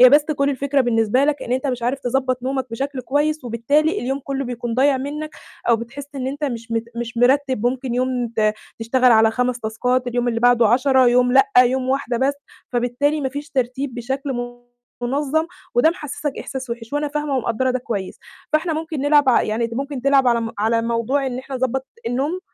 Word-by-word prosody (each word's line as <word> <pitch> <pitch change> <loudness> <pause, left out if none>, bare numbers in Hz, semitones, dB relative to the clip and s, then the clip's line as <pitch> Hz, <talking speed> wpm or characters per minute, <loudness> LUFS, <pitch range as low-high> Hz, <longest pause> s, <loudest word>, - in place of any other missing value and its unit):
هي 255 - +10
بس 290 +1 +6
كل 285 -2 0
الفكرة 280 +1 0
بالنسبة 235 +1 +2
لك 295 0 0
إن 240 - -3
أنت 260 +2 0
مش 245 -2 -3
عارف 255 +3 0
تضبّط 255 0 -1
نومك 265 0 -2
بشكل 270 +3 -3
كويس، 290 +2 0
وبالتالي 285 - +1
اليوم 265 +3 -2
كلّه 275 0 -3
بيكون 240 -1 -4
ضايع 270 +2 +3
منّك 300 +3 -5 0.4
أو 235 - +5
بتحس 270 +5 -8
إن 260 -1 -3
أنت 285 +3 -3
مش 235 -3 -4
مت 225 0 0
مش 235 0 -5
مرتّب 260 -1 +2
ممكن 250 0 -2
يوم 250 -1 0
ت 215 -1 +2 0.3
تشتغل 250 +2 +3
على 220 0 +5
5 245 +1 -1
تاسكات، 250 +4 -1
اليوم 245 0 0
اللي 230 -1 -1
بعده 240 -2 +5
10 260 +2 +4
يوم 245 +1 +3
لأ، 270 +1 +5
يوم 255 +1 +3
واحدة 265 -2 0
بس، 270 +3 +1 0.4
فبالتالي 250 +5 0
ما 270 - -1
فيش 290 +2 -7
ترتيب 260 0 -2
بشكل 265 +3 -3 0.7
مُنظّم 290 +5 0 0.3
وده 245 +7 +5
محسِسك 295 -3 -4
إحساس 260 -2 -6
وِحش 230 0 -6
وأنا 290 0 0
فاهمة 295 -1 -2
ومقدّرة 255 +1 0
ده 255 - 0
كويس، 205 -6 -5 0.4
فإحنا 320 +2 +2
ممكن 315 -2 -4
نلعب 290 0 +4
ع 250 - +5
يعني 220 +2 -1
أنت 230 0 -4
ممكن 275 0 -4
تلعب 275 -1 +4
على 235 -1 +2
م 225 0 -4
على 225 +2 +1
موضوع 235 +4 0
إن 255 -1 -3
إحنا 265 +1 -7
نضبّط 260 +1 -1 0.2
النوم، 280 +9 -1
255 Hz, 200 wpm, -21 LUFS, 240-280 Hz, 0.7 s, هي